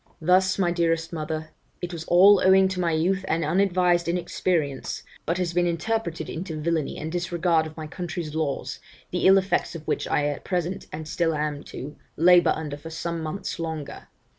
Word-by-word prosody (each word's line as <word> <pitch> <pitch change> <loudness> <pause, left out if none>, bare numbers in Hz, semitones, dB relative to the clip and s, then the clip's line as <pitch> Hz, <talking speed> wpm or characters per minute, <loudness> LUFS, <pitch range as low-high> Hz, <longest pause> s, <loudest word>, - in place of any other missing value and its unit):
'Thus, 185 +3 +3
my 180 -3 +2
dearest 165 -1 0
mother, 155 0 -4 0.3
it 175 0 -5
was 165 -1 -6
all 190 +3 +6
owing 190 0 +6
to 190 -1 -4
my 170 -2 +1
youth 180 +5 +1
and 165 -2 0
unadvised 175 0 +2
inexperience, 170 -4 -1 0.2
but 170 +2 +1
has 180 -2 -1
been 175 0 +2
interpreted 170 -1 -2
into 160 -2 -5
villany 160 -1 -1
and 160 +1 -5
disregard 175 -2 +1
of 155 - -13
my 155 - -5
country's 170 -1 -5
laws, 155 -3 -2 0.3
the - - +2
ill 195 +1 +8
effects 190 -2 0
of 155 -2 -9
which - - -1
I 145 - +1
at 145 -1 -3
present, 180 0 -2
and 155 0 -6
still 165 +1 0
am 150 -1 -2
to, 145 +3 -8 0.2
labour 175 +2 +6
under 150 -2 -5
for 145 +3 -9
some 165 +1 -4
months 175 +4 -4
longer. 160 -3 -5
170 Hz, 185 wpm, -25 LUFS, 155-180 Hz, 0.3 s, ill